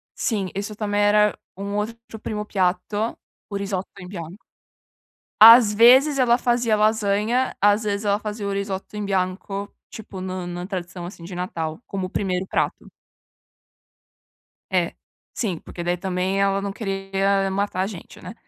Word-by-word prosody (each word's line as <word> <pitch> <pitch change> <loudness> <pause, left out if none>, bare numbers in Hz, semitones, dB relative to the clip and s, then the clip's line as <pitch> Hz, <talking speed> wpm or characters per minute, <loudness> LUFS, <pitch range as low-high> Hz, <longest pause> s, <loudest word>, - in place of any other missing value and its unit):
Sim, 200 -5 -1
isso 205 +2 -4
também 205 -1 -1
era 210 0 +4 0.2
um 200 +1 -4
outro 225 +2 -5
primo 210 0 -4
piatto 195 +3 -1 0.3
o 205 - -5
risotto 195 -1 -3
in 180 - -9
bianco. 175 0 -8 1.0
Às 225 -1 +10
vezes, 260 +6 +6
ela 240 -2 +4
fazia 240 -3 +2
lasanha, 215 +3 +1
às 205 +2 +4
vezes 205 0 -2
ela 205 0 +2
fazia 210 -1 -4
o - - -1
risot 195 -1 -3
in 210 -1 -3
bianco, 195 +1 -2 0.2
tipo, 200 -4 -9
no 185 -1 -4
na 175 +1 -5
tradição, 180 -2 -5
assim, 175 -1 -10
de 180 - -8
Natal, 170 -1 -4
como 195 -2 -3
o - - -13
1º 185 -2 -1
prato. - - -2 1.8
É, - - +1 0.4
sim, 190 -8 -2
porque 175 - -8
daí 175 +1 0
também 185 +1 -1
ela 195 0 +2
não 200 0 -3
queria 195 -1 0
matar 195 -1 -1
a 190 - 0
gente, 190 -5 -10
né. 185 - -7
200 Hz, 155 wpm, -23 LUFS, 185-210 Hz, 1.8 s, Às